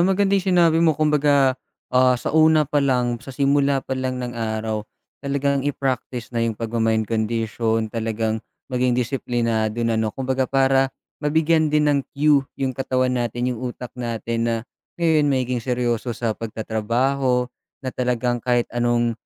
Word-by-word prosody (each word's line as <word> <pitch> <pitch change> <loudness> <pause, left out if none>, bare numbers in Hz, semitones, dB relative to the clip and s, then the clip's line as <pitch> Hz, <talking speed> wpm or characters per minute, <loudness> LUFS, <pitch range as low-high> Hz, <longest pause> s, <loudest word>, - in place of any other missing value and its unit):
maganda 195 +2 +2
yung 195 -1 +1
sinabi 165 -1 +4
mo, 160 -3 +3
kumbaga, 145 -3 +3 0.4
ah, 125 0 +4
sa - - -4
una 155 -1 +5
pa 145 +1 0
lang, 125 -3 +1
sa 140 - -14
simula 140 0 +1
pa - - -4
lang 130 -1 -2
ng 120 - -5
araw, 110 -1 -2 0.4
talagang 140 0 0
i-practice 130 -3 -3
na 115 - -1
yung 115 -2 0
pagma-mind 110 -1 0
condition, 110 0 -1
talagang 110 -1 -2 0.3
maging 125 -1 +1
disiplinado 115 -3 -1
na, 115 -1 +1
'no. 110 - 0
Kumbaga 130 -1 -1
para, 135 0 +3 0.3
mabigyan 160 +1 +2
din 150 0 +3
ng 140 - +2 0.2
cue 145 -1 +4 0.2
yung 135 -1 -1
katawan 130 -1 0
natin, 120 +2 -1
yung 120 - -7
utak 120 0 -8
natin, 115 -1 -3
na, 115 - +1 0.4
ngayon 160 -4 +3
magiging 125 -2 0
seryoso 120 -1 -1
sa 115 -2 -1
pagtatrabaho, 120 +4 -1 0.4
na 130 - -2
talagang 125 -1 -1
kahit 120 0 +1
anong, 120 -1 +1
125 Hz, 155 wpm, -22 LUFS, 115-140 Hz, 0.4 s, una